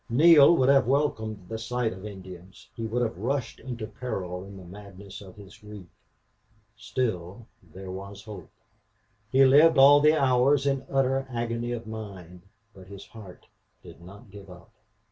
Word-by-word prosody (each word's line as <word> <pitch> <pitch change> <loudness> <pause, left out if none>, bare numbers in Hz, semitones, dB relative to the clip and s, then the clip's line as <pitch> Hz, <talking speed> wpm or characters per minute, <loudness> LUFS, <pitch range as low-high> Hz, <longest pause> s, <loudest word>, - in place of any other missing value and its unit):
Neale 155 +5 +6
would 130 +1 +2
have 140 -2 +4
welcomed 110 -8 -1
the 110 +2 -6
sight 115 0 -2
of 95 +3 -9
Indians; 95 -2 -13
he 115 -1 -5
would 120 +3 -1
have 110 -6 -4
rushed 125 +2 -3
into 120 -4 -7
peril 95 -5 -6
in 100 0 -12
the 95 - -12
madness 100 +1 -12
of 95 +1 -13
his 100 -2 -14
grief. 105 -3 -12 0.9
Still, 110 -3 -4 0.2
there 90 +2 -11
was 100 +2 -9
hope! 105 -2 -11 0.8
He 135 +1 +5
lived 150 +5 +5
all 140 +2 +7
the 155 +2 +4
hours 135 +1 +2
in 135 -1 -1
utter 135 0 0
agony 120 0 -4
of 120 -1 -5
mind, 100 -5 -9 0.3
but 95 -1 -15
his 100 0 -11
heart 105 -5 -14 0.4
did - - -14
not 100 +3 -15
give 100 -1 -13
up. 90 +5 -15
110 Hz, 165 wpm, -26 LUFS, 95-130 Hz, 0.9 s, all